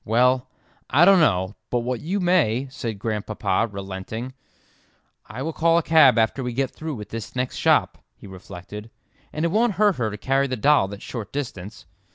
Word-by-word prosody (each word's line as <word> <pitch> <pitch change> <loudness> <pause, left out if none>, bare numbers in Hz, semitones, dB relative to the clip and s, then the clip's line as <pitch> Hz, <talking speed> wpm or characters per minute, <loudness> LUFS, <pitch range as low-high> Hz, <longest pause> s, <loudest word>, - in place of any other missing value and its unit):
"Well, 125 +3 +2 0.4
I 150 +7 +5
don't 195 -1 +6
know 95 - +2 0.2
but 120 - 0
what 125 0 -3
you 190 +6 -2
may," 155 - +2
said 115 -6 -5
Grandpapa, 105 0 -1
relenting. 100 +5 -6 0.9
"I 130 - -6
will 160 +2 -3
call 165 +1 +3
a 170 - +1
cab 155 -6 +5
after 115 +4 +1
we 125 -1 -3
get 135 +1 -1
through 155 -2 -6
with 105 -3 -9
this 115 +1 -7
next 125 0 -2
shop," - - +2 0.2
he - - -15
reflected, 95 +3 -10 0.4
"and 155 +2 -2
it 170 - 0
won't 225 +2 +2
hurt 205 -1 +2
her 115 -3 -1
to 105 - -7
carry 135 +5 +1
the 130 - -2
doll 140 -4 +3
that 100 +1 -9
short 115 -5 -7
distance." 110 -8 -6
125 Hz, 190 wpm, -23 LUFS, 105-150 Hz, 0.9 s, don't